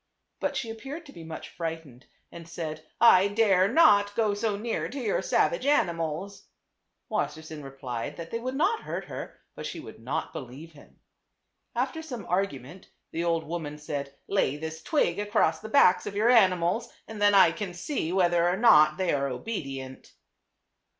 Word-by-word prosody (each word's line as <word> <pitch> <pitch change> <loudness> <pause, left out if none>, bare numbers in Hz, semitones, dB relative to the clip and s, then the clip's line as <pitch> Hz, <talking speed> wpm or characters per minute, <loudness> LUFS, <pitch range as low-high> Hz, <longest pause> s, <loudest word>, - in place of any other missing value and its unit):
But 280 - -1
she 235 -4 -3
appeared 275 +9 -8
to 280 - -13
be 165 - -10
much 160 -1 -8
frightened, 160 -6 -6 0.2
and 170 -1 -11
said, 155 -2 -6
" - - -45
1 200 -3 +5
dare 195 -4 +4
not 205 -7 +5
go 215 -3 +2
so 205 0 -1
near 225 +2 -3
to 280 - -6
your - - 0
savage - - +1
animals." 180 - -1 0.6
Wassersein 155 -5 -3
replied 130 -4 -6
that 165 -1 -8
they 230 - -2
would 255 +3 -4
not 410 +10 +1
hurt - - -5
her; - - -8 0.2
but - - -6
she - - -6
would 315 - -11
not 135 +8 -3
believe 140 +6 -9
him. 145 -3 -19 0.8
After 320 - -1
some 250 - -7
argument 180 -3 -3 0.2
the 165 - -2
old 165 -1 +1
woman 155 -2 -5
said, 140 -2 -5
"Lay 170 -8 +1
this 160 +1 -6
twig 195 - +1
across 205 +2 +1
the 220 - -9
backs 180 -8 +5
of 200 - -5
your 220 +4 +4
ani 195 -7 +6
mals 175 +7 -1 0.2
and 220 -2 -8
then 205 0 +5
I 190 -4 +7
can 180 +1 -5
see 175 - -3
whether 175 -2 +3
or 180 - 0
not 155 -9 +6
they 185 -2 0
are 140 -1 0
obedient." 135 - -6
180 Hz, 175 wpm, -27 LUFS, 155-220 Hz, 0.8 s, I